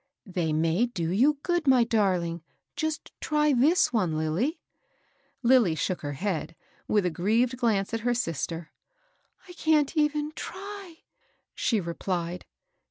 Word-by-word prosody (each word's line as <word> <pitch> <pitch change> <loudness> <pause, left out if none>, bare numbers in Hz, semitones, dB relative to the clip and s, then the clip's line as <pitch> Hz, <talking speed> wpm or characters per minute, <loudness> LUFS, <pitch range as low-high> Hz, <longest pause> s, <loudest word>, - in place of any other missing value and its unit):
" - - -63
They 165 -3 +1
may 165 +9 +2
do 175 -8 -3
you 270 +10 +3
good, 345 -4 0
my 255 -3 +6
darling. 185 -7 0 0.3
Just 315 -1 -3
try 300 -1 +2
this 285 +5 +3
one, 180 -9 +1
Lilly." 170 - -1 0.8
Lilly 235 -9 +5
shook 175 +4 -2
her 145 -1 -4
head, 170 0 -3 0.3
with 210 -3 +2
a 180 - +1
grieved 225 +9 +1
glance 225 -5 0
at 225 - 0
her 240 +2 0
sister. 165 - -3 0.4
" - - -32
I 355 - -10
can't 315 -3 +2
even 300 0 +1
try," 380 0 -8 0.5
she 225 -4 +1
replied. 175 0 -3
225 Hz, 145 wpm, -27 LUFS, -, 0.8 s, my